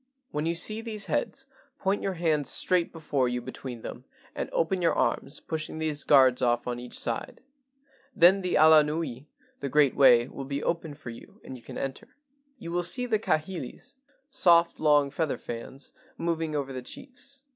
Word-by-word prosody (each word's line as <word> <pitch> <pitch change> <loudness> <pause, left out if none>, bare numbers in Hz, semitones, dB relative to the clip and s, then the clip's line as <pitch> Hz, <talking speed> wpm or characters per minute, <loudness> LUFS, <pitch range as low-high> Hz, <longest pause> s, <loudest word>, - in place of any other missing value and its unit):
"When 150 +2 -2
you 170 - 0
see 215 +6 0
these 220 -2 -3
heads, - - -2 0.3
point 195 +1 -1
your 195 -1 -2
hands 155 -4 0
straight 180 -2 +2
before 145 -6 -1
you 125 0 -2
between 125 -1 -8
them - - -8 0.3
and - - -4
open 180 +3 0
your 170 - +2
arms, 145 - -1
pushing 155 -1 -5
these 155 -2 -1
guards 130 -3 +5
off 120 -1 +1
on 120 -1 -3
each 125 0 -8
side, 115 -1 -4 0.7
then 185 +3 +6
the 180 -1 -1
ala 155 0 +7
nui 150 -3 -4 0.3
[the 140 - -4
great 145 -1 +3
way] 120 -3 +6
will 135 0 -8
be 140 +1 -4
open 165 -3 -2
for 135 -5 -9
you—and 125 +2 -12
you 125 - -12
can - - -9
enter. 135 -1 -6 0.4
"You 170 -7 -8
will 175 +1 0
see 245 +9 +2
kahilis 185 - -2 0.4
[soft 170 -6 +4
long 145 -2 +3
feather 155 0 -1
fans] 120 +4 -7 0.2
moving 165 -2 -2
over 135 -2 -3
the 130 - -5
chiefs. 270 - -11
155 Hz, 175 wpm, -27 LUFS, 135-175 Hz, 0.7 s, ala